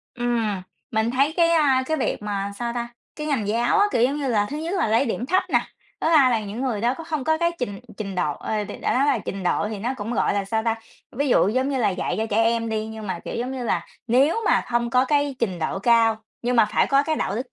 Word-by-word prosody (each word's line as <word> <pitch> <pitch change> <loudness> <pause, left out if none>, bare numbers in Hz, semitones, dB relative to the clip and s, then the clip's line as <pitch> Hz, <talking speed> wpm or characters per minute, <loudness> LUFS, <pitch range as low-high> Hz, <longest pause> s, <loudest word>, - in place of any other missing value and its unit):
Ừm. 230 -6 -1 0.3
Mình 220 0 +1
thấy 275 +5 +1
cái, 335 -1 +4
a, 285 -6 +4
cái 315 +2 0
việc 260 - -2
mà 200 -1 -3
sao 235 -1 -2
ta? 235 0 -3 0.3
Cái 300 0 -4
ngành 240 -9 -1
giáo 240 - +2
á, 410 - +5
kiểu 235 - +2
giống 275 +4 +2
như 280 -3 -2
là, 205 -3 +2
thứ 295 - -3
nhất 330 +5 -3
là 340 - +1
lấy 230 +5 +3
điểm 235 +2 -2
thấp 370 +5 +3
nè, - - +5 0.4
thứ - - +1
2 290 -6 +6
là 225 -2 +1
những 215 +6 -5
người 235 -6 -1
đó 240 +3 +1
có 330 - -7
không 310 -5 -3
có 315 0 +2
cái 340 0 +2
trình 205 -5 -4 0.2
trình 195 -3 -5
độ, 175 -5 0
ờ, 215 -1 -3
đ - - -9
đã - - +1
nói 270 +3 +3
là 270 -5 +2
trình 195 0 -5
độ 195 +3 0
thì 215 -2 -5
nó 245 +6 -2
cũng, 220 +3 -4
gọi 215 - +1
là, 200 -1 0
sao 220 +3 -1
ta? 225 -1 +2 0.4
Ví 285 0 0
dụ, 200 - +4
giống 260 +5 0
như 270 -2 -1
là, 220 - +2
dạy 185 - -2
cho 220 - 0
trẻ 220 +2 +3
em 230 0 +1
đi, 220 0 -2
nhưng 220 -1 -7
mà, 180 -2 -3
kiểu - - -5
giống 250 +3 -3
như 255 -2 -4
là, - - -1 0.2
nếu 275 - +3
mà - - +4
không 235 -1 -1
có 255 +2 +4
cái 285 0 +1
trình 190 -6 -1
độ 160 +3 -2
cao, 225 +1 +4 0.3
nhưng 245 +1 0
mà 230 - +7
phải - - +3
có 275 0 +3
cái 315 +1 -1
đạo 195 - -1
đức 250 +1 -5
240 Hz, 285 wpm, -23 LUFS, 215-275 Hz, 0.4 s, mà